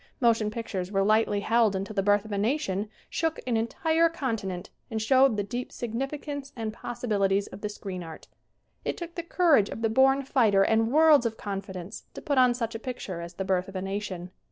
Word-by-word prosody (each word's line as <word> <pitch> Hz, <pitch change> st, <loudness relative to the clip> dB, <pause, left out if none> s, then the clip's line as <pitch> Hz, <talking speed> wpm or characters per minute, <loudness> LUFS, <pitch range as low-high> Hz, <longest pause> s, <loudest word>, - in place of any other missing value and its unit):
Motion 230 Hz, -4 st, +3 dB
pictures 205 Hz, -4 st, -4 dB
were 195 Hz, -1 st, +2 dB
lightly 215 Hz, 0 st, +2 dB
held 225 Hz, -1 st, +3 dB
until 195 Hz, +3 st, -3 dB
"The 200 Hz, -, +1 dB
Birth 205 Hz, +1 st, +3 dB
of 215 Hz, -, -9 dB
a 200 Hz, -, -1 dB
Nation" 210 Hz, -4 st, -1 dB, 0.2 s
shook 325 Hz, -1 st, -1 dB
an 245 Hz, -2 st, 0 dB
entire 320 Hz, +9 st, +2 dB
con 265 Hz, -8 st, -2 dB
tinent 190 Hz, -3 st, -5 dB, 0.2 s
and 220 Hz, -, -2 dB
showed 260 Hz, +1 st, +4 dB
the 205 Hz, -, 0 dB
deep 245 Hz, +4 st, -5 dB
significance 275 Hz, +4 st, -4 dB
and 220 Hz, -2 st, -4 dB
possibilities 200 Hz, -5 st, 0 dB
of -, -, -11 dB
the 210 Hz, -, -2 dB
screen 195 Hz, -3 st, -6 dB
art. 165 Hz, -2 st, -10 dB, 0.6 s
It -, -, -2 dB
took 340 Hz, -1 st, -7 dB
the 340 Hz, -, -3 dB
courage 330 Hz, -, +3 dB
of 225 Hz, -, -6 dB
the 225 Hz, -, +3 dB
born 270 Hz, +4 st, +4 dB
fighter 220 Hz, -7 st, +3 dB
and 225 Hz, +2 st, +2 dB
worlds 305 Hz, -4 st, +6 dB
of 220 Hz, -1 st, -6 dB
confidence 195 Hz, -2 st, -6 dB
to -, -, -7 dB
put 285 Hz, -3 st, +2 dB
on 250 Hz, -1 st, +5 dB
such 230 Hz, -1 st, -3 dB
a 225 Hz, -, -5 dB
picture 215 Hz, -8 st, -5 dB
as 170 Hz, 0 st, -8 dB
"The 190 Hz, -, -3 dB
Birth 185 Hz, -1 st, 0 dB
of 195 Hz, -, -11 dB
a 185 Hz, -, -2 dB
Nation." 195 Hz, -2 st, -4 dB
220 Hz, 210 wpm, -27 LUFS, 195-255 Hz, 0.6 s, worlds